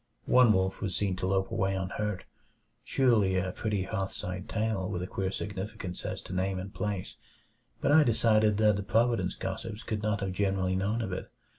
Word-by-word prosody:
One 125 -3 +6
wolf 95 -2 +1
was 95 -3 -2
seen 100 -2 0
to 95 - -2
lope 95 0 +1
away 95 -2 0
unhurt. 95 +1 -2 0.6
Surely 110 -8 +3
a 95 0 0
pretty 105 -1 -1
hearthside 95 -2 -4
tale, 105 -4 -1
with 90 -3 -3
a - - -2
queer 95 0 -2
significance 95 -2 -5
as - - -4
to - - -7
name 95 +1 0
and 95 +1 -6
place; 105 -3 -3 0.6
but - - +2
I 155 +2 +8
decided 110 -4 +3
that 105 -2 +4
the - - -2
Providence 105 -2 +1
gossips 105 +3 -5
could 110 -2 -3
not 105 -1 0
have 95 -1 -1
generally 95 -1 0
known 105 +5 0
of 95 -4 -3
it. 90 - -5
100 Hz, 185 wpm, -30 LUFS, 95-110 Hz, 0.6 s, I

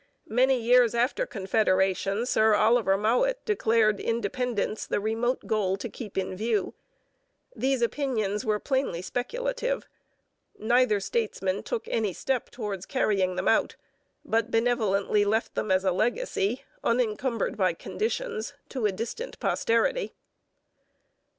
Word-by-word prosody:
' - - -38
Many 260 -1 +4
years 240 0 +4
after 255 - +1
Confederation 195 0 +1
Sir 220 -3 +4
Oliver 215 -2 +3
Mowat 250 - +1
declared 225 - +2
independence 230 -1 -2
the - - 0
remote 225 +4 -1
goal 195 -3 0
to 200 - -5
keep 215 -3 -9
in 185 -1 -1
view. 215 0 -1 0.8
These 265 -2 0
opinions 225 -6 -1
were 215 -3 +1
plainly 260 -8 -1
speculative. - - -2 0.7
Neither 235 -1 +3
statesman 195 -2 -1
took 460 -2 -4
any 220 - 0
step 260 +4 -2
towards 205 -6 -5
carrying 195 -8 +1
them 185 - -2
out, 225 - +2 0.5
but 225 +1 +1
benevolently 215 -4 +2
left 220 +2 0
them - - -2
as 185 0 +3
a 190 - +2
legacy, 230 - -1 0.2
unencumbered 235 +1 0
by - - +2
conditions, 450 0 -3 0.2
to 250 -6 0
a - - 0
distant 235 - -6
posterity. - - 0
225 Hz, 125 wpm, -27 LUFS, 205-255 Hz, 0.8 s, Many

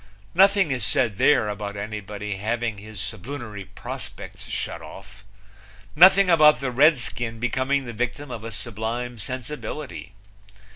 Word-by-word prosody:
Nothing 195 -2 +5
is 125 -4 -1
said 115 -3 +1
there 135 -4 +4
about 100 -1 -4
anybody 105 -1 -5
having 110 +1 -2
his 105 -1 -10
sublunary 110 +1 -6
prospects - - -8
shut - - -3
off; 100 0 -12 0.7
nothing 190 +4 +8
about 150 -6 +6
the 130 -1 -2
Redskin 125 -4 +2
becoming 130 +3 0
the 120 - -6
victim 125 +4 -3
of 110 -3 -6
a 115 - -6
sublime 115 +3 -4
sensibility. 130 -1 -6
120 Hz, 130 wpm, -24 LUFS, 105-140 Hz, 0.7 s, nothing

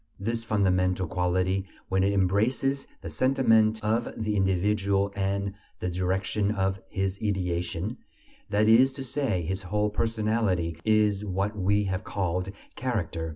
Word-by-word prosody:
This 115 +3 -2
fundamental 95 -4 +1
quality, 90 +3 0 0.2
when 95 0 +2
it 100 - +3
embraces 110 +8 +1
the - - -6
sentiment 110 -4 +3
of 115 +2 0
the 105 -1 -1
individual 100 +1 +1
and 100 0 -1 0.3
the 90 - -2
direction 95 +3 0
of 95 -2 0
his 95 0 -2
ideation, 90 +1 -2 0.5
that 105 +1 +2
is 125 +4 +6
to 135 0 -6
say, 125 -9 -1
his 95 +4 -3
whole 105 +3 -1
personality, 105 -7 0
is 105 -2 +2
what 100 +1 -2
we 100 +1 +2
have 95 0 -2
called 90 -1 -2 0.2
character. 90 -10 -2
100 Hz, 135 wpm, -27 LUFS, 95-110 Hz, 0.5 s, is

